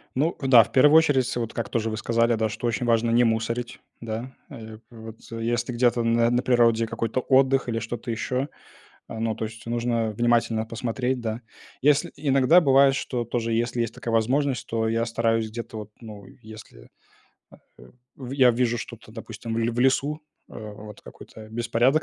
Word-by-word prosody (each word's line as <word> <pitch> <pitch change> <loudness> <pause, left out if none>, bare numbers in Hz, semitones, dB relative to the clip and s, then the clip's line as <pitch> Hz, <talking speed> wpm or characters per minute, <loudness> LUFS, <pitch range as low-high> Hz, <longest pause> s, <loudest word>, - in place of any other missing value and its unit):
Ну 155 +6 0
да. 125 -4 +7
В - - -13
первую 150 +4 +6
очередь, 145 -6 +3
с - - -4
вот, 115 -1 -4
как 115 -3 -4
тоже 115 -1 -1
вы 110 - -4
сказали, 115 +1 +1
да, 110 0 0
что 115 +3 -4
очень 115 +1 -1
важно 115 0 +2
не 120 +1 +4
мусорить, 115 +1 -2 0.2
да, 115 +3 -6 0.2
э, 110 -5 -10
вот. 110 -1 -11
Если 120 +2 -2
где-то 120 -1 +2
на 115 0 +2
на 120 +1 +1
природе 115 -2 +3
какой-то 115 +2 -3
отдых 135 0 +2
или 115 -1 -1
что-то 115 +1 -5
ещё, 125 +4 -2 0.6
а, 110 - -7
ну, 115 -1 -1
то 110 - -4
есть 115 +1 -10
нужно 115 -1 -1
внимательно 115 0 +1
посмотреть, 125 +3 -3
да. 115 +1 -4 0.4
Если 150 +4 +2
иногда 140 +4 +4
бывает, 135 -1 +5
что 120 -4 -3
тоже, 115 0 -2
если 120 +1 -1
есть 115 -1 -3
такая 115 - -5
возможность, 130 +3 0
то 110 -1 -1
я 115 +1 0
стараюсь 115 -1 0
где-то 115 0 -7
вот, 105 -1 -8
ну, 105 -3 -11 0.2
если, 110 - -13 0.9
э, 65 - -14 0.3
в 130 -1 -8
я 130 -3 +5
вижу 120 0 0
что-то, 115 -1 -10
допустим, 115 0 -7
в - - -1
ле 115 +1 0
в 120 +1 -3
лесу, 140 +4 +1 0.3
а, - - -13 0.2
вот 105 0 -11
какой-то 110 -1 -13
беспорядок 120 +6 +1
115 Hz, 185 wpm, -24 LUFS, 115-125 Hz, 0.9 s, да